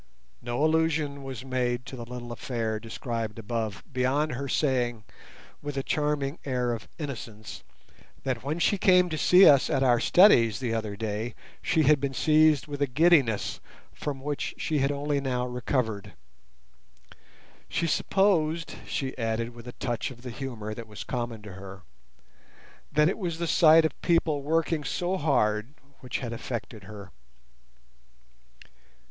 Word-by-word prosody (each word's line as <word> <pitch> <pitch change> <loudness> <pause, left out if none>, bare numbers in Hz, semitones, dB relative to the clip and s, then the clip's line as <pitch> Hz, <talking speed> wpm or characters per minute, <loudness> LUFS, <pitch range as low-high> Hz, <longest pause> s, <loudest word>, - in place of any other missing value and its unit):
No 120 +5 0
allusion 155 -3 +1
was 135 -2 -7
made 125 -1 -1
to - - -8
the 120 -2 -8
little 120 -1 -7
affair 115 -2 -3
described 115 -1 -4
above 110 -2 -3
beyond 135 +4 +1
her 140 +3 -4
saying, 125 -6 0 0.6
with 145 -1 -5
a 135 - -1
charming 150 -1 -1
air 125 -3 -1
of 110 -5 -7
innocence, 115 -7 -7 0.6
that 130 -4 -2
when 150 +4 -2
she 195 +3 +2
came 180 -1 +5
to 155 - -3
see 185 +5 +7
us 140 -3 +6
at 135 -4 +1
our 120 -2 +4
studies 115 - +5
the 120 -3 -2
other 110 -2 -3
day 110 +2 -3 0.3
she 160 -2 +2
had 150 0 +5
been 135 -1 -2
seized 155 -1 +4
with 145 -1 -7
a 140 - +3
giddiness 135 -5 +3 0.3
from 140 -2 -5
which 145 +1 -3
she 155 -3 -1
had 135 +1 +2
only 145 0 -1
now 125 -2 -1
recovered. 115 -5 -2 1.6
She 170 - 0
supposed, 165 -2 +1
she 135 -2 -3
added 115 +1 -2
with 120 0 -12
a 120 - -7
touch 120 -3 -3
of 125 -2 -13
the 125 - -6
humour 115 -5 -5
that 115 +1 -8
was 105 -1 -8
common 120 -3 -4
to 105 -3 -9
her, 95 -1 -10 1.1
that 150 +1 +4
it 190 - -1
was 170 -5 -3
the 170 - -2
sight 160 0 +6
of 160 - -3
people 165 -4 +2
working 160 +1 0
so 180 +5 -1
hard 120 -5 +1 0.2
which 125 0 -4
had 120 - -4
affected 115 -4 -6
her. 100 -1 -10
130 Hz, 155 wpm, -27 LUFS, 115-150 Hz, 1.6 s, see